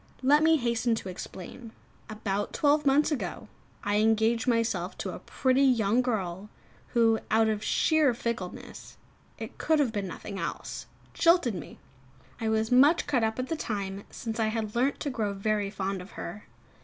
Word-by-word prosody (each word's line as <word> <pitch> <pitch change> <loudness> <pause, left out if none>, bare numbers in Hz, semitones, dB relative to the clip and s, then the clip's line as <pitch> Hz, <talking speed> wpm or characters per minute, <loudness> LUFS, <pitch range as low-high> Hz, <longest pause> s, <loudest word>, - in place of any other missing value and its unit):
Let 290 +3 +5
me 320 0 +5
hasten 235 -2 +1
to 195 - -6
explain. 190 +5 -9 0.4
About 205 -1 -3
twelve 295 0 +2
months 290 +3 +4
ago 295 - -3 0.4
I 205 0 +1
engaged 225 +2 +2
myself 230 -1 0
to - - -4
a - - -7
pretty 260 0 +1
young 240 -3 +3
girl, 200 -5 -3 0.5
who, 225 -1 +4
out 220 0 +4
of 215 -1 -1
sheer 310 -4 +3
fickleness 230 -6 -6 0.4
it - - -8
could 315 - +2
have 280 -6 +2
been 205 -3 -3
nothing 195 +2 -7
else - - -5 0.3
jilted 335 -8 +4
me. 175 -6 -8 0.6
I 225 - -1
was 220 +1 0
much 285 +7 +5
cut 265 -5 +1
up 220 0 0
at 255 0 -2
the 325 - -2
time, 200 -8 -4
since 225 -1 -5
I 220 - +2
had 220 -1 -3
learnt 260 +4 +1
to 285 - -2
grow 215 -5 -2
very 205 0 -1
fond 195 -1 -3
of 180 - -12
her. 210 - -7
225 Hz, 170 wpm, -28 LUFS, 205-255 Hz, 0.6 s, Let